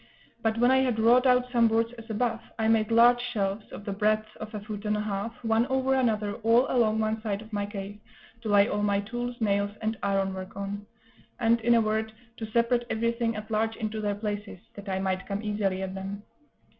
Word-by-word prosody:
But 225 0 0
when 245 +2 +4
I 265 - +5
had 255 -4 +1
wrought 240 +4 +5
out 250 0 +3
some 235 -2 +4
boards 230 +1 +1
as 230 -1 -12
above, 225 +1 -1 0.2
I 220 0 +1
made 220 -1 +3
large 240 +1 +6
shelves, 210 -4 -3
of 205 - -9
the 205 - -3
breadth 215 +1 0
of 215 0 -7
a - - -3
foot 205 0 -7
and 210 0 +1
a - - -1
half, 210 +2 -3
one 225 +1 +2
over 265 0 +1
another 220 -6 +1
all 230 +3 +4
along 220 -3 +2
one 220 0 -1
side 205 -3 -2
of 220 +1 -13
my 205 -1 -1
cave, 205 0 -7 0.4
to 225 - -4
lay 205 0 +5
all 205 - -1
my 200 -1 +2
tools, 240 +3 -5
nails, 200 -2 +1
and 220 0 -2
ironwork 195 -1 -2
on; 200 +1 -5 0.5
and, 230 0 +3
in 235 +1 +4
a 230 - +5
word, 220 0 -1 0.3
to 220 - -5
separate 235 +2 +2
everything 230 0 0
at 215 +1 -7
large 220 +1 0
into 215 0 -3
their 205 -1 -1
places, 205 -1 -4 0.2
that 200 -1 -9
I 190 - 0
might 190 -1 -2
come 200 +1 -3
easily 200 -3 -1
at 190 0 -4
them. 195 +1 -6
220 Hz, 220 wpm, -27 LUFS, 205-230 Hz, 0.5 s, large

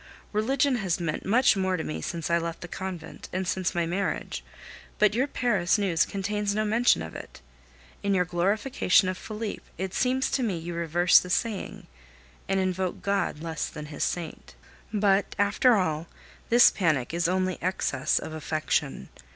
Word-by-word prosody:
Religion 255 +5 +2
has 190 -6 -1
meant 165 0 -3
much 245 +3 +4
more 190 -1 0
to 160 - -3
me 155 - -4
since 170 -1 -4
I 170 - +4
left 165 0 -5
the 175 - -6
convent 185 -1 -7
and 185 0 -2
since 185 0 -1
my 170 -1 +1
marriage; 190 +4 -2 0.5
but 210 -1 +4
your 255 +5 +1
Paris 210 -9 +1
news 185 -6 +1
contains 200 +1 -2
no 215 0 +1
mention 225 - +3
of 80 - -8
it. - - -9 0.6
In 200 -1 +1
your 180 -1 +2
glorification 190 +3 +2
of 185 - -2
Felipe 215 +2 -5 0.2
it 190 +1 -4
seems 260 +1 +1
to 270 - +1
me 210 -8 0
you 170 +1 -6
reverse 170 +1 +4
the 180 - -7
saying, 210 +2 -2 0.6
and 195 - +2
invoke 185 -1 -2
God 195 -6 -1
less 160 -2 -3
than 150 - -8
His - - -2
saint. 165 - -4 0.4
But, 200 -2 +2
after 210 +5 +4
all, 165 -4 -1 0.4
this 240 +1 +7
panic 155 - 0
is 170 0 +1
only 185 0 0
excess 155 -6 0
of 155 - -4
affection. 155 - -2
185 Hz, 170 wpm, -27 LUFS, 170-210 Hz, 0.6 s, this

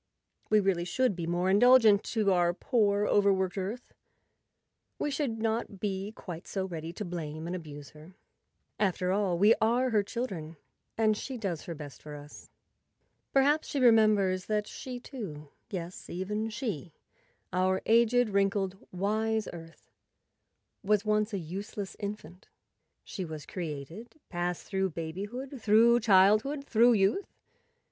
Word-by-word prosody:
We 215 - +5
really 190 -4 +1
should 250 +4 0
be 170 -2 -4
more 175 +2 0
indulgent 215 0 +6
to 215 -3 +1
our 175 -1 +2
poor, 205 -3 +1
overworked 190 -3 +2
Earth; 205 +6 -5 1.0
we 295 - -2
should 275 -5 -2
not 220 -2 -2
be 195 0 -3
quite 175 -2 -8
so 190 -2 -2
ready 165 -3 -6
to 210 - -5
blame 160 -3 -5
and 175 +2 -3
abuse 145 -5 -9
her. 155 +4 -15 0.6
After 185 -2 +1
all, 195 -3 +1
we 205 +5 +6
are 245 +3 +2
her 210 -2 +3
chil¬ 235 +4 -3
dren 165 -7 -7 0.4
and 215 -1 +3
she 260 +4 -5
does 190 -8 -4
her 170 - -5
best 145 -2 -10
for 150 -1 -9
us. 145 0 -12 0.8
Perhaps 290 +3 +3
she 285 - -2
re¬ 245 -3 +7
members 200 -4 +3
that 210 -1 0
she, 255 +1 -7
too—yes, 180 - -8
even 210 +5 -3
she, 205 - -5 0.6
our 185 +1 +2
aged, 235 +1 +4
wrinkled, 195 -1 0
wise 215 +3 -1
Earth—was 190 +4 -6
once 215 0 +1
a 200 - -2
useless 195 +3 -6
infant. 200 -3 -7 0.6
She 190 - -6
was 155 -3 -7
created, 170 - -7
passed 175 -1 -3
through 190 -1 -1
babyhood, 205 - -6
through 225 +3 +5
childhood, 215 +7 +4
through 235 -1 +5
youth. 205 - +1
200 Hz, 140 wpm, -29 LUFS, 175-220 Hz, 1.0 s, re¬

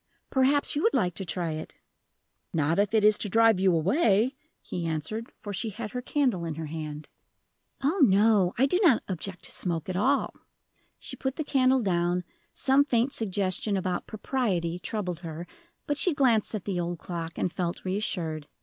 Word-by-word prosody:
"Perhaps 275 +3 +2
you 295 - 0
would 450 - +2
like 180 -1 +1
to 190 +4 -5
try 170 -1 -2
it." 155 0 -6 0.8
"Not 160 +3 +1
if 205 0 +2
it 220 -2 +3
is 210 0 +5
to 205 - -2
drive 225 -1 +4
you 190 0 +4
away," 220 - +2 0.2
he 170 -2 -4
answered, 165 +9 -4
for 205 - -7
she 220 +3 -2
had 215 0 -6
her 250 - -4
candle 250 - 0
in 165 -2 -3
her 160 +1 -5
hand. 150 -1 -6 0.8
"Oh, 315 +8 +1
no; 200 -4 +4
I 260 - +4
do 360 +7 +3
not 315 - +5
object 185 0 -5
to - - -6
smoke 170 -4 -2
at 185 - -2
all." 265 +9 +1 0.6
She - - -4
put 265 0 -3
the 310 - -2
candle 260 -3 +3
down; 175 -1 +1 0.3
some 275 +1 +4
faint 255 -1 +1
suggestion 200 -1 -1
about 185 -1 -2
"propriety" 195 -7 -1
troubled 180 -4 -4
her, 165 0 -7 0.4
but 290 0 0
she 340 -2 +5
glanced 235 -6 +2
at 205 - -5
the 190 -3 -2
old 175 0 -2
clock, 165 -1 -5
and 175 - -1
felt 175 -1 -3
reassured. 170 -6 -2
200 Hz, 185 wpm, -27 LUFS, 175-250 Hz, 0.8 s, is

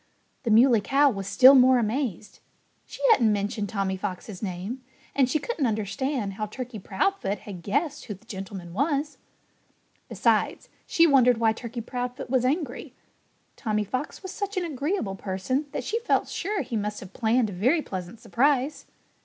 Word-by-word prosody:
The 235 - -3
Muley 230 0 +6
Cow 275 +6 +3
was 195 -3 -5
still 260 +6 +8
more 260 -1 +6
amazed. 230 -3 -2 0.5
She - - -10
hadn't 235 - +5
mentioned 205 0 -2
Tommy 195 -2 -1
Fox's 190 0 -6
name; 200 +6 -4 0.3
and 265 -3 +3
she 310 - +2
couldn't 310 - -1
understand 220 +1 -2
how 215 +2 -4
Turkey 245 0 -7
Proudfoot 205 - -1
had 190 -4 -8
guessed 285 - -1
who 210 - -5
the 200 +5 -22
gentleman 190 -4 -7
was. 285 - -1 0.9
Besides, - - +1 0.2
she 335 - +4
wondered 255 -6 +5
why 225 -1 +3
Turkey 235 +1 -6
Proudfoot 245 +1 -5
was 255 -2 +2
angry. 280 -1 -2 0.6
Tommy 215 -3 -1
Fox 255 - -4
was 375 - -6
such 405 -1 -4
an 360 - 0
agreeable 290 - -2
person 200 +10 -2
that - - -3
she 455 - -1
felt 470 - +1
sure 400 +2 -2
he 245 - -5
must 210 -1 -2
have 190 -1 -11
planned 225 -1 +1
a - - -7
very 260 - +2
pleasant 185 +3 -6
surprise. 280 +2 +1
240 Hz, 165 wpm, -26 LUFS, 205-280 Hz, 0.9 s, still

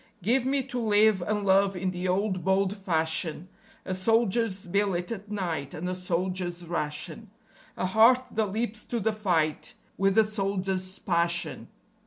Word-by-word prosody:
_ - - -20
Give 245 +5 +2
me 275 0 +1
to 250 -1 -4
live 215 -3 +4
and 205 +3 -1
love 195 0 +3
in 185 +1 -1
the 180 0 -3
old, 185 -1 0
bold 190 +1 +2
fashion; 165 -2 -1 0.4
A 185 - -2
soldier's 220 0 +1
billet 185 0 0
at 210 -2 -6
night 170 -9 -3
and 175 +3 -4
a 185 - -1
soldier's 180 -1 -2
ration; 150 -3 -4 0.5
A - - -1
heart 225 +7 +5
that 220 -1 0
leaps 220 0 -3
to 240 - -2
the 220 +1 0
fight 170 -8 0 0.2
with 195 +1 +2
a 220 - +8
soldier's 195 -3 -2
passion. 170 -1 -1
190 Hz, 160 wpm, -27 LUFS, 180-215 Hz, 0.5 s, a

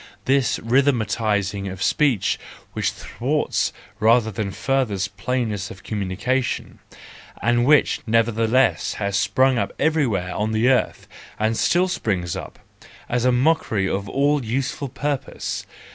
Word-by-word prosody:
—this 135 -2 +2
rhythmising 110 -6 +1
of 95 +1 -5
speech 135 -10 +2 0.3
which - - 0
thwarts - - -1 0.3
rather 110 0 +4
than 100 0 -3
furthers 110 -4 -1
plainness 110 -1 -2
of 95 - -11
communication, 110 +6 -2 0.6
and 120 +1 +2
which, 150 0 +4
nevertheless, 115 +2 +2
has 100 -1 -2
sprung 130 +5 +3
up 100 - -1
everywhere 125 - +1
on 110 +1 -1
the 110 +3 +2
earth, 130 -1 +1 0.3
and 110 +1 +1
still 175 +9 +2
springs 95 - -2
up, - - -7 0.5
as 125 0 0
a 125 - +5
mockery 125 -7 +2
of 100 +1 -2
all 140 0 +1
useful 130 +4 -2
purpose! 140 +1 -3
115 Hz, 125 wpm, -22 LUFS, 100-130 Hz, 0.6 s, a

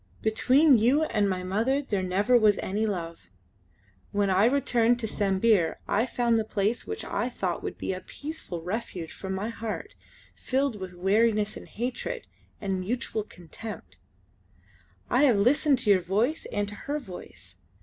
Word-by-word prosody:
"Between 255 +5 +5
you 260 +8 +4
and 210 -9 +1
my 185 -1 -2
mother 225 +9 +1
there 210 -9 -2
never 195 +7 +2
was 215 -4 +5
any 210 +3 -1
love. 165 - -5 0.8
When 200 -1 +1
I 190 +3 +4
returned 245 -2 +3
to 220 - -2
Sambir 195 -4 +2
I 225 +5 +1
found 235 -2 +1
the - - 0
place 215 +2 -1
which 435 0 -5
I - - -1
thought - - -3
would - - -5
be - - -2
a 185 - -6
peaceful 285 - -7
refuge 180 -3 -4
for 190 - -8
my 190 +3 -2
heart, 230 - -5 0.4
filled 265 -4 -1
with 185 -1 -7
weariness 210 +3 +2
and - - -10
hatred 255 - -4 0.3
and 195 -2 -2
mutual 220 +3 -2
contempt. 205 +3 -10 1.1
I 260 +4 +4
have 245 -7 +4
listened 275 +6 +4
to 215 -4 +3
your 190 -2 +5
voice 215 - 0
and 205 0 -1
to 205 - -8
her 295 - +1
voice. 175 - -11
215 Hz, 160 wpm, -27 LUFS, 190-245 Hz, 1.1 s, Between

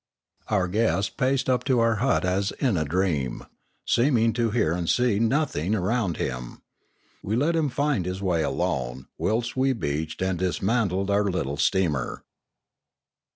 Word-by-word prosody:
Our 95 -4 +1
guest 100 -1 0
paced 130 +1 +1
up 130 -1 +1
to 130 -3 +2
our 115 -1 +2
hut 125 -3 +1
as 95 +2 0
in 125 -7 0
a 80 -2 0
dream, 75 -6 -1 0.4
seem 125 +2 +3
ing 115 0 +2
to 115 0 +1
hear 105 -8 +1
and 85 -1 -2
see 120 -5 +2
nothing 115 - +1
around 100 -2 0
him. 60 -2 -5 0.6
We 105 - -2
let 150 +7 +1
him 155 -3 +1
find 130 -7 0
his 90 +1 -3
way 90 -4 0
alone, 65 -3 -2
whilst 115 +2 -1
we 135 +1 +2
beached 80 - -3
and 95 -2 -1
dismantled 95 +1 0
our 100 +1 +2
little 75 -8 -2
steamer. 75 -5 0
100 Hz, 155 wpm, -25 LUFS, 90-120 Hz, 0.6 s, seem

